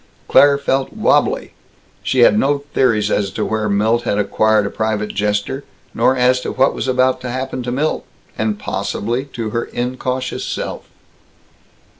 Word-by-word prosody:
Claire 140 Hz, 0 st, +6 dB
felt 135 Hz, -1 st, -1 dB
wabbly. -, -, +1 dB, 0.5 s
She 130 Hz, -, +1 dB
had 110 Hz, -, +6 dB
no 140 Hz, +5 st, +1 dB
theories 105 Hz, -5 st, +2 dB
as 100 Hz, -2 st, +1 dB
to -, -, -2 dB
where 110 Hz, -1 st, -1 dB
Milt 110 Hz, +4 st, +2 dB
had 115 Hz, -4 st, -1 dB
acquired 105 Hz, +1 st, +2 dB
a 100 Hz, -, -3 dB
private 110 Hz, -1 st, -2 dB
jester, 105 Hz, +6 st, -1 dB, 0.3 s
nor 130 Hz, -, +2 dB
as 125 Hz, 0 st, +3 dB
to -, -, -3 dB
what 135 Hz, +1 st, +2 dB
was -, -, -4 dB
about 130 Hz, 0 st, +2 dB
to 125 Hz, -, -5 dB
happen 130 Hz, +1 st, -3 dB
to 125 Hz, 0 st, -4 dB
Milt 145 Hz, +5 st, -1 dB, 0.3 s
and 110 Hz, -1 st, -1 dB
possibly 120 Hz, +4 st, -3 dB
to 115 Hz, -6 st, -5 dB
her 115 Hz, +1 st, -1 dB
incautious 130 Hz, +1 st, -3 dB
self. -, -, -5 dB
120 Hz, 160 wpm, -18 LUFS, 105-130 Hz, 0.5 s, Claire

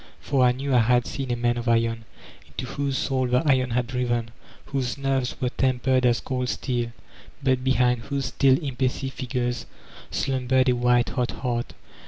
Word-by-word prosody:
For 135 Hz, -3 st, +1 dB
I 125 Hz, -, +6 dB
knew 135 Hz, +2 st, -2 dB
I 125 Hz, -, +6 dB
had 120 Hz, +1 st, +3 dB
seen 135 Hz, -2 st, -4 dB
a 120 Hz, -, +1 dB
Man 120 Hz, 0 st, 0 dB
of 120 Hz, +1 st, -4 dB
Iron, 115 Hz, -1 st, +1 dB, 0.4 s
into -, -, -6 dB
whose 140 Hz, -1 st, -2 dB
soul 130 Hz, -2 st, 0 dB
the 125 Hz, +3 st, +2 dB
iron 130 Hz, -3 st, +3 dB
had 125 Hz, +1 st, 0 dB
driven, 120 Hz, -2 st, -1 dB, 0.3 s
whose 130 Hz, -2 st, -2 dB
nerves 135 Hz, -2 st, -1 dB
were 125 Hz, -3 st, 0 dB
tempered 130 Hz, 0 st, +2 dB
as 120 Hz, -1 st, +2 dB
cold 125 Hz, -1 st, -2 dB
steel, 120 Hz, -3 st, -2 dB, 0.5 s
but 130 Hz, -1 st, +2 dB
behind 125 Hz, -2 st, +3 dB
whose 140 Hz, -1 st, -2 dB
still, 135 Hz, -2 st, +3 dB
impassive 135 Hz, 0 st, -2 dB
features 120 Hz, -3 st, -3 dB, 0.4 s
slumbered 130 Hz, 0 st, +1 dB
a -, -, +4 dB
white 120 Hz, 0 st, +3 dB
hot 125 Hz, -2 st, -1 dB
heart. 120 Hz, -2 st, -3 dB
125 Hz, 175 wpm, -25 LUFS, 120-130 Hz, 0.5 s, I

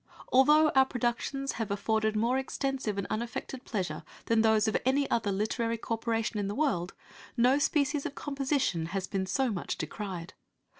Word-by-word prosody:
Although 300 Hz, +4 st, +6 dB
our 265 Hz, -2 st, +4 dB
productions 260 Hz, +2 st, -1 dB
have 225 Hz, -2 st, -4 dB
afforded 215 Hz, +2 st, 0 dB
more 235 Hz, +5 st, +2 dB
extensive 265 Hz, -5 st, -2 dB
and 200 Hz, -, -1 dB
unaffected 235 Hz, +3 st, -4 dB
pleasure 180 Hz, -9 st, -3 dB, 0.2 s
than 230 Hz, -1 st, +3 dB
those 220 Hz, -1 st, +4 dB
of 220 Hz, -, 0 dB
any 275 Hz, +2 st, +2 dB
other 220 Hz, -3 st, +1 dB
literary 230 Hz, +3 st, -1 dB
corporation 225 Hz, -1 st, -2 dB
in 200 Hz, -, -1 dB
the 205 Hz, -, -3 dB
world, 205 Hz, -, 0 dB, 0.4 s
no 250 Hz, +4 st, +4 dB
species 290 Hz, -1 st, +1 dB
of 295 Hz, -4 st, -5 dB
composition 275 Hz, -, -1 dB
has 190 Hz, -, -2 dB
been 190 Hz, 0 st, -2 dB
so 255 Hz, +6 st, +1 dB
much 185 Hz, -4 st, -3 dB
decried. 180 Hz, +1 st, -5 dB
230 Hz, 160 wpm, -30 LUFS, 205-270 Hz, 0.4 s, Although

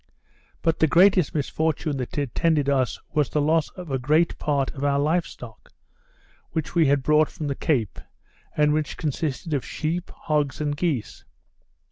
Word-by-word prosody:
But 165 Hz, -1 st, +1 dB
the 160 Hz, -, +4 dB
greatest 180 Hz, 0 st, +4 dB
misfortune 155 Hz, 0 st, -1 dB
that 125 Hz, +2 st, -5 dB
attended 145 Hz, +2 st, +1 dB
us, 130 Hz, -3 st, +1 dB
was 150 Hz, -3 st, +1 dB
the 150 Hz, -, 0 dB
loss 155 Hz, +1 st, +2 dB
of 145 Hz, -8 st, -4 dB
great 155 Hz, +5 st, +2 dB
part 140 Hz, -3 st, 0 dB
of 140 Hz, -, -7 dB
our 140 Hz, -1 st, +2 dB
live 160 Hz, +4 st, +1 dB
stock, 115 Hz, -3 st, -12 dB, 0.8 s
which 160 Hz, -2 st, -3 dB
we 165 Hz, -4 st, +4 dB
had 140 Hz, -1 st, +2 dB
brought 150 Hz, +1 st, +3 dB
from 160 Hz, -5 st, -6 dB
the 140 Hz, -, -1 dB
Cape, 125 Hz, -, -1 dB, 0.6 s
and 150 Hz, 0 st, +4 dB
which 155 Hz, -1 st, -2 dB
consisted 155 Hz, +1 st, -3 dB
of 140 Hz, -, 0 dB
sheep, 170 Hz, +3 st, -3 dB
hogs, 150 Hz, -3 st, -2 dB
and 145 Hz, -1 st, -1 dB
geese. 145 Hz, -, -2 dB
150 Hz, 160 wpm, -24 LUFS, 140-160 Hz, 0.8 s, the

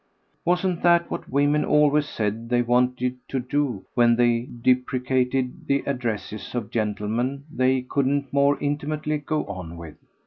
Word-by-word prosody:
Wasn't 180 Hz, 0 st, +1 dB
that 170 Hz, 0 st, +3 dB
what -, -, -5 dB
women 145 Hz, +2 st, +2 dB
always 150 Hz, 0 st, +3 dB
said 110 Hz, +2 st, -3 dB
they 120 Hz, 0 st, +2 dB
wanted 125 Hz, +1 st, +1 dB
to 135 Hz, -, -2 dB
do 130 Hz, -4 st, -2 dB
when 120 Hz, -1 st, +4 dB
they 120 Hz, 0 st, +2 dB, 0.2 s
deprecated 125 Hz, 0 st, 0 dB
the 140 Hz, 0 st, +1 dB
addresses 120 Hz, -5 st, -4 dB
of 115 Hz, -4 st, -3 dB
gentlemen 110 Hz, +5 st, -1 dB
they 130 Hz, -1 st, +2 dB
couldn't 140 Hz, +1 st, -1 dB
more 140 Hz, 0 st, +3 dB
intimately 150 Hz, +1 st, -2 dB
go 150 Hz, +1 st, -2 dB
on 90 Hz, -4 st, -7 dB
with? 85 Hz, -2 st, -10 dB
130 Hz, 140 wpm, -24 LUFS, 120-145 Hz, 0.2 s, when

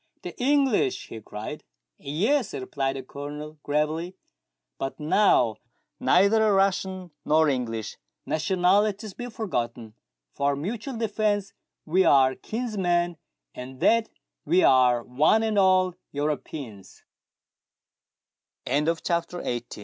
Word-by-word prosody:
"The -, -, -7 dB
English 270 Hz, -, +2 dB
!" -, -, -23 dB
he 110 Hz, -, -8 dB
cried. 105 Hz, +1 st, -7 dB, 0.3 s
" -, -, -60 dB
Yes," 215 Hz, -, 0 dB
replied 135 Hz, +1 st, -2 dB
the 135 Hz, -, -6 dB
Colonel 150 Hz, +3 st, -8 dB
gravely; 155 Hz, +5 st, -1 dB, 0.6 s
"but 135 Hz, -, -4 dB
now 150 Hz, -, +3 dB, 0.4 s
neither 215 Hz, +2 st, +4 dB
Russian 190 Hz, -2 st, 0 dB
nor 155 Hz, +1 st, +3 dB
English. 120 Hz, -5 st, -2 dB, 0.3 s
Nationalities 195 Hz, +5 st, +1 dB
be 245 Hz, +4 st, -6 dB
forgotten; 120 Hz, -, -4 dB, 0.4 s
for 140 Hz, 0 st, 0 dB
mutual 220 Hz, -, -5 dB
defence 210 Hz, -2 st, -1 dB, 0.3 s
we 185 Hz, +4 st, +3 dB
are 135 Hz, -4 st, +5 dB
kinsmen, 180 Hz, -, -1 dB, 0.4 s
in 130 Hz, +1 st, -9 dB
that 230 Hz, -, +3 dB, 0.3 s
we 175 Hz, +5 st, +3 dB
are 125 Hz, -2 st, +4 dB
one 155 Hz, -, +2 dB
and 215 Hz, -2 st, +1 dB
all 185 Hz, -1 st, +4 dB, 0.2 s
Europeans 140 Hz, -, -5 dB, 1.6 s
1" 125 Hz, -, -3 dB
The -, -, +2 dB
English 165 Hz, -1 st, -1 dB
come 170 Hz, -1 st, +1 dB
to 150 Hz, -9 st, -3 dB
th -, -, -9 dB
170 Hz, 120 wpm, -26 LUFS, 135-205 Hz, 1.6 s, are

